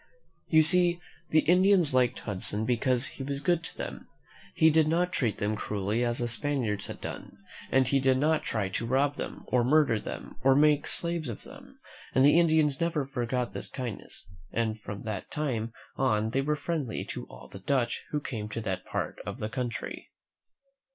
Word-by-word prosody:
You 160 -1 +6
see 175 +1 +4 0.3
the 155 - +5
Indians 180 -3 +4
liked 125 -1 +2
Hudson 105 +1 0
because 125 +2 +2
he 135 - -5
was 140 0 -3
good 170 +3 +1
to - - -6
them. - - -6 0.5
He 160 0 +5
did 155 0 +4
not 175 +3 +1
treat 120 -10 0
them 105 +1 -1
cruelly 105 +2 -1
as 120 0 0
the 120 - -1
Spaniards 120 -5 -1
had - - -7
done, - - -7 0.3
and 130 -1 +4
he 135 +1 +3
did 130 -1 +3
not 155 +3 +2
try 105 -4 -1
to 115 +4 -3
rob 140 +3 +1
them, - - -6
or 125 -1 +2
murder 135 -3 +3
them, - - -7
or 135 0 +5
make 150 0 +4
slaves 170 -4 -1
of 115 - -7
them; - - -14 0.4
and 130 - +6
the 150 +4 +6
Indians 155 -4 +3
never 165 -4 0
forgot 125 -2 -2
this - - -5
kindness, 120 -7 -6 0.3
and 110 -1 -1
from 100 0 -7
that 105 -4 -5
time 120 -7 -2 0.3
on 110 -4 +1
they 135 - +1
were 150 +2 0
friendly 150 -7 -3
to - - -6
all - - -12
the 95 - -10
Dutch 120 +3 0
who 150 - -1
came 110 -7 -5
to 115 - -4
that 95 -4 -3
part - - -3
of - - -6
the 105 - -4
country. 125 -1 -4
130 Hz, 190 wpm, -29 LUFS, 115-150 Hz, 0.5 s, You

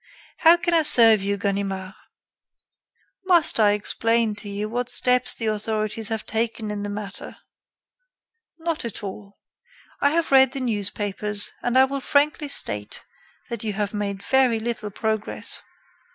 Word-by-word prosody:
How 335 +1 +6
can 345 0 -1
I 330 - +4
serve 225 -8 +6
you, 200 +1 -2
Ganimard?" 195 -1 -3 1.3
"Must 345 -9 +6
I 205 -2 +4
explain 225 +2 0
to 210 - -8
you 205 +1 -4
what 245 +2 -3
steps 250 0 +2
the 225 - -5
authorities 215 0 -2
have 220 -1 -4
taken 225 -1 -3
in 205 -1 -4
the 205 - -4
matter?" 205 -1 -7 1.2
"Not 330 -1 -3
at 230 -3 -6
all. 200 +1 -9 0.6
I 285 - +4
have 325 +1 -1
read 265 -1 +5
the 275 - -3
newspapers 205 -3 -2
and 245 +1 0
I 260 - +7
will 275 +1 -4
frankly 295 +2 +1
state 105 - -3 0.5
that 235 -2 -4
you 215 -2 -3
have 205 0 -3
made 200 -1 -4
very 260 -4 +2
little 225 -2 -4
progress." 220 +1 -4
220 Hz, 150 wpm, -23 LUFS, 205-255 Hz, 1.3 s, I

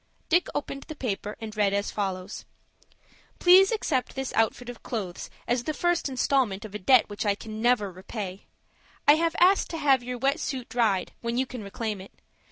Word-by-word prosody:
Dick 345 +1 +3
opened 275 -1 -3
the 310 - -7
paper, 210 -6 -3
and 220 -1 -7
read 200 -2 +2
as 200 0 -1
follows,— 190 -1 -4 0.9
"Please 375 +3 +7
accept 295 - -1
this 265 -1 -4
outfit 225 +2 +1
of 245 -2 -8
clothes 195 -7 -5 0.2
as 240 0 0
the 310 - -2
first 350 -4 +1
instalment 250 -6 0
of 210 - -10
a 210 - -4
debt 250 +5 +5
which 205 -1 -4
I 205 -2 +2
can 215 +1 -8
never 230 -5 +2
repay. 190 +1 -7 0.6
I 290 - +10
have 330 0 0
asked 375 +3 +4
to 330 - -4
have 275 -4 +3
your 250 0 -5
wet 275 +3 +1
suit 260 -4 -4
dried, 215 -6 +1
when 235 0 -2
you 260 - +2
can 250 -3 -8
reclaim 210 0 -4
it. 190 - -13
240 Hz, 190 wpm, -27 LUFS, 205-275 Hz, 0.9 s, I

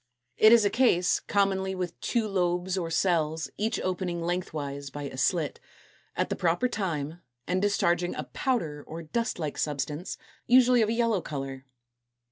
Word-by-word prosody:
It 215 - +7
is 230 -3 +7
a 200 - +2
case, 190 -8 +3
commonly 190 -1 0
with 180 -2 -4
two 230 -3 0
lobes 180 -1 0
or 175 -3 -2
cells, 160 -2 0
each 220 +2 -1
opening 180 -2 -2
lengthwise 150 -5 -3
by 145 +1 -7
a 140 - -6
slit, 150 +2 0 0.6
at - - 0
the - - -1
proper 175 +8 +1
time, 170 - -3 0.2
and 185 +1 0
discharging 175 -3 +1
a - - -3
powder 160 - -2
or 165 +1 -7
dust 230 +9 -2
like 155 -4 -4
substance, 150 +3 -3 0.3
usually 250 0 +6
of 215 - +2
a - - +1
yellow 230 -4 +1
color. 135 -3 -6
175 Hz, 160 wpm, -28 LUFS, 155-205 Hz, 0.6 s, It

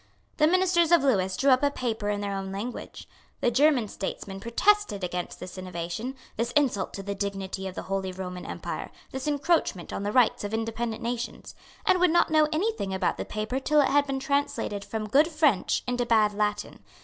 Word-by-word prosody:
The 305 - +5
ministers 350 -1 +3
of 340 -4 +6
Lewis 190 -8 +2
drew 275 0 +4
up 255 - +5
a 285 - +3
paper 225 -6 -2
in 205 0 -1
their 200 -1 -2
own 195 0 -4
language. 210 +6 -6 0.3
The 240 - +2
German 265 -2 +3
statesmen 195 0 -5
protested 235 - +2
against 180 0 -4
this 185 +1 -8
innovation, 180 +7 -5 0.2
this 230 +1 0
insult 255 -10 +1
to 195 - -6
the 200 +1 -3
dignity 195 -1 -4
of 185 - -7
the - - -5
Holy 190 -1 -2
Roman 180 -1 -6
Empire, - - -5 0.2
this 265 +2 -5
encroachment 290 - 0
on - - -3
the 205 +1 -1
rights 245 -2 +3
of 205 +2 -2
independent 225 +1 -3
nations, 240 0 -4 0.3
and 365 - +4
would 360 0 +5
not 340 0 +3
know 310 -1 +5
any 380 +9 +1
thing 195 - -4
about 185 -1 0
the - - -4
paper 215 +5 -3
till 300 +2 +2
it 285 - +4
had 285 +1 +3
been 270 -1 -1
translated 280 -8 -1
from 215 0 -4
good 285 +8 +4
French 300 - +2
into 245 0 0
bad 215 -3 +4
Latin. 210 0 -2
230 Hz, 200 wpm, -27 LUFS, 195-285 Hz, 0.3 s, of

